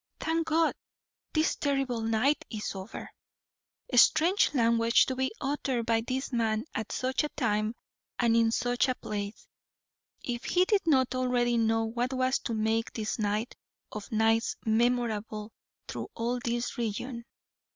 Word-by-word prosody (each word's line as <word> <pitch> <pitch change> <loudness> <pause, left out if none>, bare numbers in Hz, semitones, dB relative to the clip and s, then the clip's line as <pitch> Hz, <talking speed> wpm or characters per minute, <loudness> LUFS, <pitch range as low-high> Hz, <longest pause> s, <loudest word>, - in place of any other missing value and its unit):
"Thank 325 0 -1
God! 320 +1 +3 0.6
this 310 0 +1
terrible 270 -5 0
night 225 +6 +1
is 215 -1 -4
over!" 190 +2 -8 0.8
Strange 330 +10 +5
language 230 -1 +4
to 260 - -3
be 265 0 0
uttered 270 -4 -1
by 225 -1 +2
this 260 +3 -3
man 220 -1 0
at 220 -1 -4
such 260 +2 0
a 300 - -2
time 215 -4 -1 0.4
and 235 -2 +3
in 230 -1 +4
such 245 +2 +1
a 255 - +1
place, 205 -1 -5 0.8
if 240 -1 -3
he 360 +1 +3
did 395 -3 +1
not 260 -5 +3
already 250 -1 +1
know 225 0 +2
what 240 +3 -2
was 255 0 +1
to 230 - -3
make 220 +1 0
this 220 +1 -3
night 210 +3 -1 0.4
of 210 -1 -7
nights 225 +1 +2
memorable 220 -2 0 0.4
through - - -5
all 240 +2 -1
this 240 +1 -2
region. 235 +2 -3
235 Hz, 145 wpm, -29 LUFS, 225-260 Hz, 0.8 s, Strange